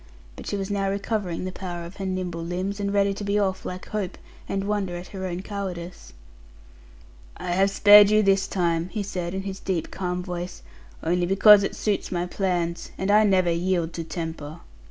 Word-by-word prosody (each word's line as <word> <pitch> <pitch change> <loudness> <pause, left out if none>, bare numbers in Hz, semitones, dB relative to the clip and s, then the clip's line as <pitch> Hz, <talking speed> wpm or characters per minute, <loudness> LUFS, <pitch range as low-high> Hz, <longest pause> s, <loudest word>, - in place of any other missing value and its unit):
But - - -10
she 205 - -2
was 195 +1 -4
now 195 -1 0
recovering 195 -3 -2
the 185 - -3
power 175 -2 -6
of 175 +3 -11
her 195 -1 -3
nimble 180 -3 -3
limbs; 185 +4 -3
and 200 -1 -1
ready 200 0 +2
to 200 - -6
be 200 0 0
off 190 -2 0
like 185 0 -6
hope, 210 -4 -3 0.3
and 195 0 -1
wonder 200 -3 -1
at 175 - -9
her 190 -1 -5
own 180 +1 -4
cowardice. 185 -4 -6 1.3
'I 175 - -4
have 190 +2 +3
spared 205 +1 +8
you 215 0 +4
this 195 -1 +3
time,' 170 -2 0
he 210 +1 -3
said, 180 -2 -4
in 190 - -3
his 195 0 -5
deep 180 -4 -2
calm 180 -1 -3
voice, 180 0 -6 0.4
'only 175 +2 +1
because 200 +2 +7
it 195 - -2
suits 210 -2 -1
my 175 -1 -1
plans; 175 -2 -2
and 190 +1 0
I 210 +1 +6
never 185 -4 +3
yield 170 -1 0
to 165 - -4
temper. 160 -1 -6
190 Hz, 195 wpm, -25 LUFS, 175-200 Hz, 1.3 s, spared